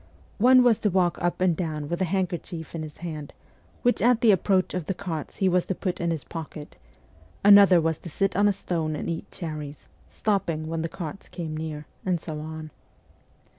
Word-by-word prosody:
One 255 Hz, +3 st, +7 dB
was 240 Hz, -3 st, +4 dB
to 210 Hz, -, +1 dB
walk 180 Hz, -2 st, +1 dB
up 175 Hz, +1 st, -1 dB
and 180 Hz, -3 st, +3 dB
down 155 Hz, -3 st, -3 dB
with 170 Hz, +4 st, -3 dB
a -, -, +3 dB
handkerchief 175 Hz, -2 st, -3 dB
in 165 Hz, -, -4 dB
his 155 Hz, -1 st, -8 dB
hand, 155 Hz, -3 st, -6 dB, 0.5 s
which 245 Hz, -, +2 dB
at 240 Hz, -1 st, +4 dB
the 230 Hz, -, +6 dB
approach 190 Hz, 0 st, +2 dB
of 180 Hz, -4 st, -3 dB
the 195 Hz, -, -2 dB
carts 170 Hz, -6 st, -5 dB
he 190 Hz, -, +1 dB
was 180 Hz, -1 st, +2 dB
to 190 Hz, -, -1 dB
put 180 Hz, -1 st, -3 dB
into 170 Hz, -1 st, +1 dB
his 150 Hz, -, -9 dB
pocket; 155 Hz, -2 st, -8 dB, 0.7 s
another 200 Hz, -3 st, +8 dB
was 160 Hz, -1 st, 0 dB
to 170 Hz, -, -9 dB
sit 195 Hz, +5 st, 0 dB
on 205 Hz, +2 st, +4 dB
a -, -, +4 dB
stone 165 Hz, -5 st, -2 dB
and -, -, -4 dB
eat 165 Hz, -1 st, -4 dB
cherries, 155 Hz, -4 st, -7 dB, 0.2 s
stopping 170 Hz, -7 st, -1 dB
when 165 Hz, 0 st, -3 dB
the 165 Hz, -, -2 dB
carts 170 Hz, +2 st, -7 dB
came 160 Hz, -3 st, -5 dB
near; 155 Hz, -1 st, -5 dB, 0.2 s
and 180 Hz, -2 st, 0 dB
so 155 Hz, -1 st, -6 dB
on. 155 Hz, 0 st, -7 dB
170 Hz, 205 wpm, -26 LUFS, 155-190 Hz, 0.7 s, another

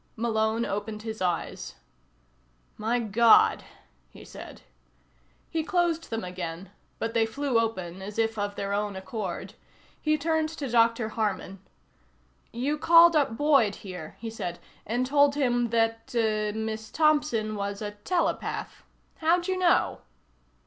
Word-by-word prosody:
Malone 225 Hz, 0 st, 0 dB
opened 210 Hz, +1 st, -4 dB
his 220 Hz, -2 st, -6 dB
eyes. 180 Hz, -2 st, -2 dB, 1.0 s
"My 225 Hz, +3 st, 0 dB
God," 230 Hz, 0 st, +5 dB, 0.5 s
he -, -, -14 dB
said. -, -, -11 dB, 0.9 s
He 325 Hz, -2 st, 0 dB
closed 345 Hz, -1 st, 0 dB
them 225 Hz, -1 st, -3 dB
again 180 Hz, 0 st, -6 dB, 0.3 s
but 225 Hz, 0 st, -3 dB
they 225 Hz, -1 st, +2 dB
flew 270 Hz, 0 st, 0 dB
open 190 Hz, -5 st, -3 dB
as 205 Hz, +2 st, -7 dB
if 225 Hz, 0 st, +1 dB
of 205 Hz, -1 st, -3 dB
their 200 Hz, 0 st, -3 dB
own 205 Hz, -1 st, -1 dB
accord. 190 Hz, 0 st, -5 dB, 0.5 s
He 305 Hz, 0 st, +2 dB
turned 315 Hz, +1 st, 0 dB
to 310 Hz, -3 st, -5 dB
Dr. 230 Hz, -1 st, +3 dB
Harman. 205 Hz, -3 st, -3 dB, 0.9 s
"You 280 Hz, +6 st, -2 dB
called 335 Hz, +1 st, +7 dB
up 275 Hz, -7 st, +2 dB
Boyd 275 Hz, -9 st, +3 dB
here," 180 Hz, -5 st, -9 dB
he 225 Hz, -1 st, -5 dB
said, 175 Hz, -6 st, -5 dB, 0.3 s
"and 240 Hz, +4 st, 0 dB
told 285 Hz, +1 st, +4 dB
him 245 Hz, -4 st, +1 dB
that 225 Hz, +1 st, 0 dB
er 215 Hz, -2 st, +1 dB
Miss 220 Hz, 0 st, -4 dB
Thompson 295 Hz, -9 st, +2 dB
was 200 Hz, -1 st, -3 dB
a 210 Hz, -1 st, -4 dB
telepath. 330 Hz, -, -2 dB, 0.3 s
How'd 345 Hz, +2 st, +2 dB
you 375 Hz, -, 0 dB
know?" 355 Hz, -2 st, +2 dB
225 Hz, 135 wpm, -27 LUFS, 205-285 Hz, 1.0 s, called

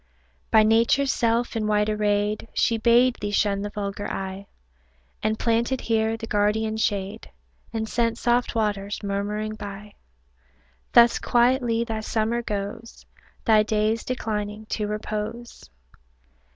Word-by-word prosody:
By 220 Hz, -1 st, +6 dB
Nature's 230 Hz, +5 st, +3 dB
self 235 Hz, 0 st, 0 dB
in 215 Hz, -2 st, -1 dB
white 210 Hz, 0 st, +2 dB
arrayed, 210 Hz, 0 st, 0 dB
She 230 Hz, -1 st, +2 dB
bade 240 Hz, +2 st, +4 dB
thee 205 Hz, -, -2 dB
shun 205 Hz, -1 st, +1 dB
the 205 Hz, -, -3 dB
vulgar 205 Hz, 0 st, -4 dB
eye, 195 Hz, +1 st, -5 dB, 0.7 s
And 215 Hz, 0 st, 0 dB
planted 235 Hz, +3 st, +1 dB
here 225 Hz, 0 st, 0 dB
the 225 Hz, -, -6 dB
guardian 215 Hz, +1 st, 0 dB
shade, 205 Hz, -1 st, -2 dB, 0.4 s
And 220 Hz, -1 st, -3 dB
sent 230 Hz, 0 st, 0 dB
soft 240 Hz, 0 st, +1 dB
waters 205 Hz, -2 st, -1 dB
murmuring 205 Hz, +2 st, -2 dB
by; 205 Hz, 0 st, -8 dB, 1.0 s
Thus 235 Hz, 0 st, +6 dB
quietly 240 Hz, -1 st, +2 dB
thy 225 Hz, -2 st, -3 dB
summer 220 Hz, +2 st, -1 dB
goes, 210 Hz, +1 st, -6 dB, 0.4 s
Thy 220 Hz, -2 st, +5 dB
days 215 Hz, +1 st, 0 dB
declining 215 Hz, -3 st, -3 dB
to 210 Hz, -1 st, -2 dB
repose. 215 Hz, -, -5 dB
220 Hz, 125 wpm, -24 LUFS, 210-230 Hz, 1.0 s, By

